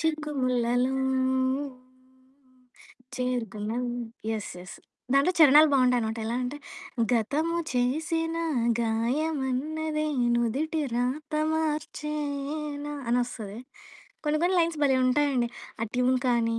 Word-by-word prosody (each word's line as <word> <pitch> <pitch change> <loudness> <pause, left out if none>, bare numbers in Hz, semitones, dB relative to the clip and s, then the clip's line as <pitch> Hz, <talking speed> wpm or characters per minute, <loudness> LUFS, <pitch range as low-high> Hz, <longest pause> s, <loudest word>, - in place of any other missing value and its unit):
చిక్కుముల్లలో 260 -5 0 2.2
చేరుకున్నావి. 240 -1 -2 0.4
Yes. 215 -2 -3
Yes 180 +1 -10 0.4
దాంట్లో 280 +6 +4
చరణాలు 305 0 +8
బావుంటాయనమాట, 250 -4 +2
ఎలా 230 - -1
అంటే, 250 +3 -3 0.6
గతము 290 +9 +1 0.2
చేసిన 320 +6 0 0.5
గాయమన్నది, 290 +6 -1 0.3
నుదిటి 275 +7 0
రాత 255 +6 -2 0.2
మార్చేన. 300 -1 -3 0.2
అనోస్తది. 235 -4 -2 0.7
కొన్ని, 300 0 +1
కొన్ని 365 +1 +3
లైన్స్ 330 -2 0
భలే 265 -2 +3
ఉంటాయండి, 260 -2 +2 0.3
ఆ - - +2
ట్యూన్ 250 +1 +3
కానీ, 230 -1 +2
265 Hz, 85 wpm, -27 LUFS, 240-305 Hz, 2.2 s, చరణాలు